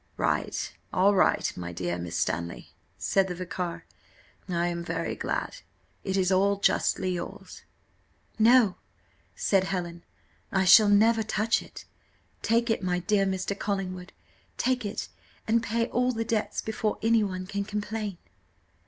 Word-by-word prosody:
"Right - - -1 0.2
all 195 +3 +4
right, 190 - +2
my 85 -1 -6
dear 85 0 -3
Miss 85 -1 -4
Stanley," 85 +1 -3 0.2
said 195 -1 +1
the 180 - -4
vicar; 180 -1 -5 0.6
"I 170 -1 0
am 170 -1 -3
very 165 -1 -3
glad - - -3 0.5
it 190 0 -1
is 185 0 +2
all 200 +2 +3
justly 190 -1 +1
yours." 175 -1 -6 0.8
"No," 225 -3 +5 0.6
said 195 -2 +2
Helen, 175 -3 -4 0.5
"I 190 -1 +2
shall 205 +3 +8
never 220 +3 +5
touch 220 +1 +1
it: - - -12 0.6
take 235 +1 +2
it, 225 - 0
my 180 -1 0
dear 195 +2 +1
Mr. 190 +1 -2
Collingwood, 185 -2 -3 0.5
take 250 -4 0
it, 200 - -4 0.4
and 230 +1 +3
pay 230 +1 0
all 250 +1 +1
the 225 -2 -3
debts 220 -1 -1
before 220 -1 -2
any 225 -1 +4
one 185 -2 -3
can 200 +1 -3
complain." 210 -1 -4
195 Hz, 145 wpm, -27 LUFS, 180-220 Hz, 0.8 s, shall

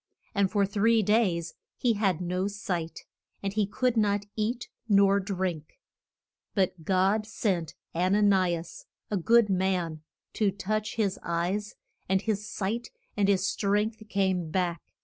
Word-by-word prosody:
And 200 -3 +2
for 200 -1 +2
three 215 +3 +3
days 185 -6 +1 0.2
he 240 -2 +2
had 195 -5 +1
no 180 +2 -1
sight; 185 -5 -4 0.4
and 195 0 -2
he 210 -1 +1
could 250 +3 0
not 205 -2 +2
eat 230 +3 -2 0.2
nor 200 -1 +5
drink. 185 -5 -3 0.8
But 185 -4 0
God 195 +5 +2
sent 185 -7 -1 0.2
An 185 +4 +2
a 210 - +3
ni 190 -4 +4
as, 165 0 -9 0.2
a 205 - +1
good 230 +5 +4
man, 185 -4 0 0.3
to 210 -2 +2
touch 215 +2 -2
his 205 -4 0
eyes, 180 +5 -2 0.3
and 190 0 +3
his 215 -1 -2
sight 220 +5 -3 0.3
and 205 -2 +2
his 195 -1 +3
strength 210 +3 0
came 190 -4 0
back. 175 -1 -1
195 Hz, 150 wpm, -28 LUFS, 185-210 Hz, 0.8 s, nor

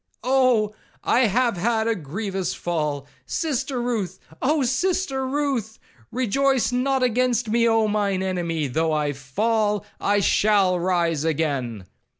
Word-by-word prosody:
'Oh! 250 -5 +3 0.3
I 245 -1 +3
have 235 0 +1
had 225 +4 +1
a 230 - +2
grievous 190 +2 -4
fall,—Sister 170 - -3
Ruth,—Oh 240 - -2
Sister 270 0 0
Ruth!—Rejoice 255 - -1
not 260 +1 +1
against 245 -1 +1
me, 235 +1 +3
Oh 225 -1 +3
mine 200 -3 0
enemy! 170 -4 -1
though 160 +4 0
I 150 -1 0
fall, 210 - 0
I 205 0 +2
shall 195 -2 +3
rise 170 -4 0
again.' 140 - -1
215 Hz, 115 wpm, -23 LUFS, 170-250 Hz, 0.3 s, Oh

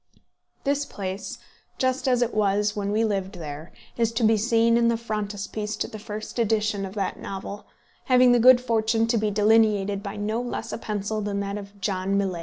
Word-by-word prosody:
This 285 0 +1
place, 195 -7 -5 0.4
just 260 +1 0
as 250 -1 +3
it 240 - -3
was 205 0 +1
when 200 -1 -2
we 220 +2 +2
lived 195 -2 -2
there, 155 -1 -7 0.3
is 230 -1 +2
to 230 +1 -1
be 220 0 +5
seen 230 +1 +3
in 235 0 +3
the 235 0 +2
frontispiece 210 -1 -4
to - - -2
the 215 - -9
first 215 +2 -6
edition 215 -3 +1
of 190 - -11
that 195 -2 -2
novel, 200 +1 -7 0.4
having 250 -1 +5
had 240 - +4
the - - 0
good 255 -1 +9
fortune 225 -2 +1
to 230 +1 +1
be 215 0 +1
delineated 205 -1 +3
by 200 0 -6
no 215 +3 -2
less 245 - -5
a - - -4
pencil 215 0 -3
than 200 -1 -2
that 200 0 -3
of 200 0 -12
John 195 0 -1
Millais. 190 -3 -1
215 Hz, 205 wpm, -25 LUFS, 200-230 Hz, 0.4 s, good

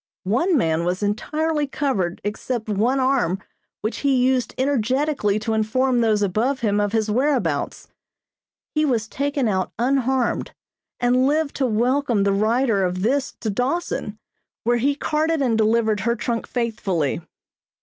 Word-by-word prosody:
One 265 - +2
man 165 -7 +1
was 180 +3 -1
entirely 300 +9 -1
covered 235 -12 -1
except 220 +3 -3
one 225 +6 +1
arm 255 -9 +1 0.4
which 215 +2 -2
he 280 -2 +1
used 255 0 +1
energetically 260 -3 +1
to 220 +1 -2
inform 240 +3 +1
those 215 -2 +2
above 225 +8 0
him 205 -2 +1
of 205 -1 0
his 220 -1 0
whereabouts. 240 - 0 0.9
He 305 - +2
was 235 -7 +1
taken 280 0 -1
out 190 -3 0
unharmed, 260 0 0 0.4
and 250 +2 +3
lived 300 0 0
to 265 - +1
welcome 240 0 +1
the 200 0 +2
writer 220 0 +2
of 185 0 -1
this 270 +5 0
to 220 - -1
Dawson, 250 - -2 0.5
where 240 +1 +2
he 280 +4 +1
carted 315 +2 0
and 250 -5 +2
delivered 220 -1 +2
her 235 +4 0
trunk 235 0 -3
faithfully. 200 - -1
235 Hz, 145 wpm, -22 LUFS, 210-270 Hz, 0.9 s, and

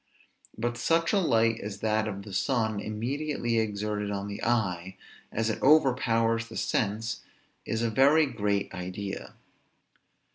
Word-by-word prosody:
But 120 +2 -2
such 165 - +2
a 205 - +4
light 115 -9 +2
as 100 -1 -6
that 110 0 +1
of 100 -2 -5
the 100 -1 -10
sun, 110 0 0
immediately 120 +3 -1
exerted 105 -1 -2
on 100 0 -3
the 100 0 -6
eye, 95 -6 0 0.3
as 115 +1 0
it - - -5
overpowers 115 -6 +3
the - - -8
sense, 110 +2 -1 0.5
is 110 +1 -1
a 115 - +1
very 145 +6 +5
great 105 -7 -1
idea. 95 +2 -6
110 Hz, 140 wpm, -28 LUFS, 105-120 Hz, 0.5 s, very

